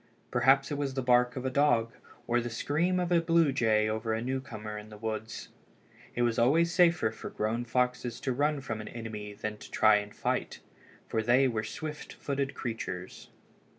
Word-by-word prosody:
Perhaps 135 +3 +4
it 145 - -2
was 135 -2 -2
the 130 - -1
bark 125 0 +3
of 130 0 -5
a 130 - 0
dog 125 -5 +2 0.3
or 120 +1 +1
the 120 - -4
scream 160 +10 0
of 180 0 -1
a 170 -1 +4
blue 165 -3 +3
jay 110 -4 +2
over 110 +1 -1
a - - -2
newcomer 120 -5 -4
in 105 0 -8
the 105 - -11
woods. 110 +1 -5 0.7
It 120 - +1
was 120 -1 +1
always 165 +8 +3
safer 170 -11 +4
for - - -8
grown 115 +3 -2
foxes 125 0 -1
to 130 - -1
run 145 +2 +1
from 110 -5 -4
an - - -8
enemy 110 -3 -6
than 105 +1 -5
to - - -12
try 105 -1 +4
to 105 - -13
fight, - - -2 0.5
for 110 - 0
they 125 +4 +4
were 110 -3 -1
swift 150 +7 -6
footed 140 -1 -3
creatures. 95 -6 -5
120 Hz, 190 wpm, -30 LUFS, 110-140 Hz, 0.7 s, Perhaps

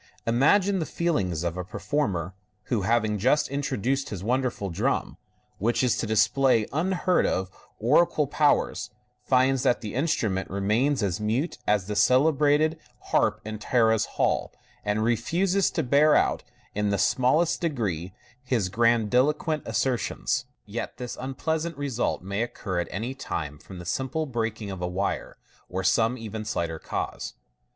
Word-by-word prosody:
Imagine 185 - +3
the 160 - -2
feelings 95 - -1
of 85 0 -2
a 90 - -2
performer 95 - -2 0.4
who, 110 - +2
having 110 +1 +1
just 135 +8 +3
introduced 135 0 -1
his 95 -3 -6
wonderful 120 -4 -1
drum, 85 - -1 0.4
which 120 +5 +1
is 125 - +3
to 115 - -2
display 110 +2 +3
unheard 180 +3 +1
of 95 0 -1 0.3
oracular 150 +6 +3
powers, 145 +1 +1 0.3
finds 130 0 +3
that 125 - +2
the 105 - -5
instrument 110 - 0
remains 110 +8 +1
as 95 -2 -1
mute 120 +10 -1
as 105 -3 +2
the 105 +1 -4
cele 130 +9 +4
brated 150 +3 +2 0.3
harp - - +2
in 110 0 -5
Tara's 110 -1 +2
halls, - - +1 0.3
and 105 +1 0
refuses 175 - +1
to 160 - -1
bear 145 +4 +4
out, - - +2 0.3
in 105 0 0
the 100 - +1
smallest 140 - +2
degree, 100 - -2 0.3
his 120 -7 0
grandiloquent 120 - +2
assertions. 125 0 -1 0.2
Yet 105 +3 -5
this 125 -1 -5
unpleasant 160 +5 -2
result 135 -9 -1
may 100 +3 -2
occur 100 -6 -3
at 85 - -2
any 115 +7 -3
time 75 - -5
from 95 - -11
the 90 - -8
simple 135 - -1
breaking 115 -5 -3
of 95 -2 -6
a 90 - -1
wire, 95 +3 -3 0.3
or 95 +1 -3
some 115 +6 +2
even 110 -2 -6
slighter 85 -6 -2
cause. - - -4
120 Hz, 150 wpm, -26 LUFS, 100-140 Hz, 0.4 s, cele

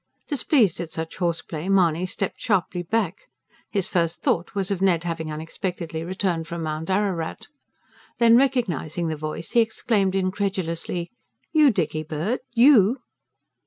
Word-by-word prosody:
Displeased 255 - +2
at 170 -2 -4
such 160 0 -5
horseplay, 170 -1 -2
Mahony 180 -2 +3
stepped 185 +1 -4
sharply 185 -4 0
back 195 0 -2 0.4
his 200 -2 -1
first 170 -5 -1
thought 170 +3 0
was 195 0 -1
of 190 -2 -1
Ned 175 -4 +3
having 165 -2 -3
unexpectedly 160 +1 -4
returned 175 -2 -2
from 170 0 -4
Mount 155 +1 -4
Ararat. 190 -4 -1 0.7
Then 230 -1 +6
recognising 180 - +1
the 160 - -2
voice, 155 +2 -5
he 240 - +4
exclaimed 215 -3 0
incredulously: 185 -2 -2 0.4
"YOU, 305 -3 +6
Dickybird? 160 - -1 0.2
You!" 240 -1 +6
180 Hz, 130 wpm, -24 LUFS, 165-205 Hz, 0.7 s, Then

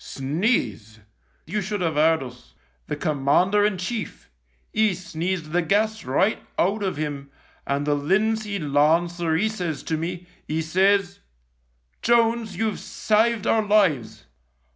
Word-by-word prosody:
Sneeze! 135 - -2 0.2
— - - -40
you 205 +6 -2
should 205 +1 -3
have 165 -3 0
'eard 160 0 +3
us. 125 -1 -13 0.3
The - - -2
Commander 155 +8 +2
in 205 -2 +1
Chief 200 - -5 0.2
— 60 0 -41
'e 215 -3 +2
sneezed 170 -1 -4
the 175 +2 +2
gas 215 +5 0
right 185 +12 +1
out 200 +4 +1
of 190 -6 -2
'im, 145 -2 -4 0.4
and 140 +1 -1
the 150 - +2
Linseed 200 +6 0
Lancer 160 +3 +2
'e 210 +7 +2
says 180 -8 -4
to 160 - -2
me, 175 +2 -4 0.2
'e 155 +1 -1
says, 190 +3 +2 0.4
' - - -44
Jones, 230 -4 +2
you've 220 +1 -1
saved 220 0 +1
our 225 - +3
lives.' 190 - +1
175 Hz, 145 wpm, -24 LUFS, 150-210 Hz, 0.4 s, eard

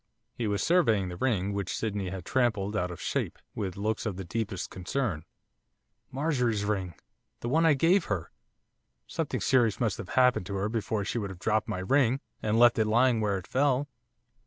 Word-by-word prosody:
He 120 -3 -3
was 100 -1 0
surveying 115 - +3
the 90 - -6
ring, 100 -3 0
which 100 -2 -2
Sydney 100 -4 -2
had 95 -2 -6
trampled 110 -5 0
out 90 -3 0
of 90 - -8
shape, - - -2 0.2
with 95 -4 -4
looks 110 +2 -1
of 100 -4 -3
the 95 - -4
deepest 100 0 -3
concern. 95 - -2 0.8
'Marjorie's 125 -7 0
ring! 95 -5 -2 0.5
The 120 - -3
one 165 +5 +3
I 155 - +5
gave 170 +6 +3
her! 95 -6 -3 0.7
Something - - -3
serious 120 -5 +3
must 110 -6 0
have 90 - -7
happened 125 -7 +3
to 100 - -4
her 100 +2 -1
before 110 -2 -2
she 120 - -2
would 100 -3 -3
have 95 - -8
dropped 110 +3 0
my - - -2
ring, 130 +6 +2 0.2
and 110 +1 +1
left 120 0 +6
it 110 - +2
lying 120 +1 +3
where 100 -2 +1
it 95 - -7
fell. 140 +1 +1
110 Hz, 190 wpm, -29 LUFS, 95-125 Hz, 0.8 s, left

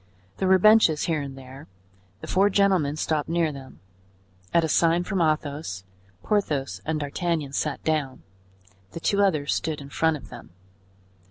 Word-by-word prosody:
There 190 - 0
were 190 0 +6
benches 215 -6 +5
here 160 -3 0
and 135 -1 -7
there; 135 +2 -12 0.5
the - - -8
four 195 +2 +3
gentlemen 190 -8 +2
stopped 155 -1 -2
near 165 -2 +1
them; 135 -2 -12 0.7
at 170 - +3
a - - +1
sign 165 +2 +2
from 190 0 -2
Athos, 145 - -2 0.4
Porthos 140 - -1
and 160 -1 -1
D'Artagnan 150 0 -2
sat 150 0 -2
down, 150 -4 -2 0.7
the - - -6
two 200 +4 +1
others 155 -8 +1
stood 160 -1 -2
in 140 -1 -10
front 160 +1 +1
of 130 - -14
them. 120 - -11
155 Hz, 160 wpm, -25 LUFS, 140-175 Hz, 0.7 s, were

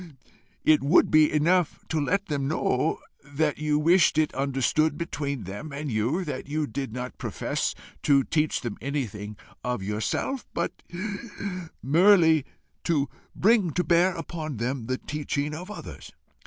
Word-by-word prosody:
"It 155 -1 +5
would 145 +6 +4
be 155 -1 +6
enough 170 +3 +2
to 160 -2 0
let 200 +8 0
them 145 -6 -2
know 150 0 +1 0.3
that 145 +1 -1
you 150 -1 +1
wished 165 +1 +4
it 155 -1 +2
understood 140 +3 +1
between 140 -6 -3
them 105 - -7
and 140 0 -4
you, 120 - 0
that 140 -4 -5
you 155 +1 0
did 135 -1 -4
not 125 +2 -6
profess - - -2 0.3
to 140 -2 +4
teach 155 +1 0
them 120 -4 -4
anything 105 -7 -4 0.3
of 125 -5 -2
yourself, 110 - -2
but 170 - -2 1.0
merely 160 -1 +5 0.4
to 145 -5 +1 0.3
bring 200 -5 +3
to 180 - +1
bear 175 +1 +3
upon 160 -4 -5
them 120 +1 -2
the 130 0 0
teaching 150 0 -3
of 180 +5 -7
others. 210 - -9
150 Hz, 145 wpm, -26 LUFS, 135-165 Hz, 1.0 s, be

